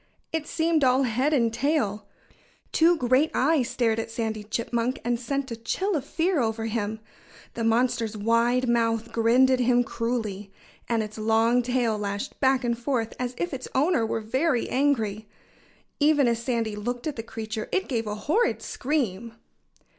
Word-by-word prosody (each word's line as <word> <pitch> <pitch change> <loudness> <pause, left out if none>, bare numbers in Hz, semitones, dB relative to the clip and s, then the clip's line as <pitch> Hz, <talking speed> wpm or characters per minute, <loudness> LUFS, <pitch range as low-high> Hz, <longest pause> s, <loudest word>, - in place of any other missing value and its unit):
It 320 -2 -2
seemed 325 -2 +1
all 260 +1 +4
head 255 +4 +1
and 235 -6 +2
tail. 225 -8 0 0.6
Two 335 +2 +4
great 260 +4 +3
eyes 275 -2 +2
stared 225 -2 +1
at 225 - -4
Sandy 220 -2 -3
Chipmunk 230 +3 -2
and 240 -1 0
sent 275 +1 -3
a - - -2
chill 370 - -2
of 290 - -1
fear 330 +3 0
over 225 -2 -1
him. 220 -1 -2 0.5
The 230 - -3
monster's 230 -1 +1
wide 230 +4 +2
mouth 230 -1 +1
grinned 240 +3 +4
at 260 - +2
him 245 0 +3
cruelly. 220 -5 -3 0.4
And 230 -2 +1
its 215 +1 -8
long 225 +3 +3
tail 240 -3 0
lashed 200 0 -4
back 265 -1 +3
and 235 -1 0
forth 235 -2 -2
as 250 0 -3
if 350 -3 -2
its 260 -1 -5
owner 285 -2 +3
were 225 0 -1
very 260 +4 0
angry. 225 -7 0 0.7
Even 295 -3 +4
as 235 -1 +1
Sandy 230 -3 -1
looked 240 +4 -4
at 305 -3 -2
the 225 - -4
creature 220 -1 -6
it 380 - 0
gave 230 -4 -2
a 210 - -2
horrid 435 +12 +1
scream. 235 -6 -2
235 Hz, 170 wpm, -26 LUFS, 225-265 Hz, 0.7 s, all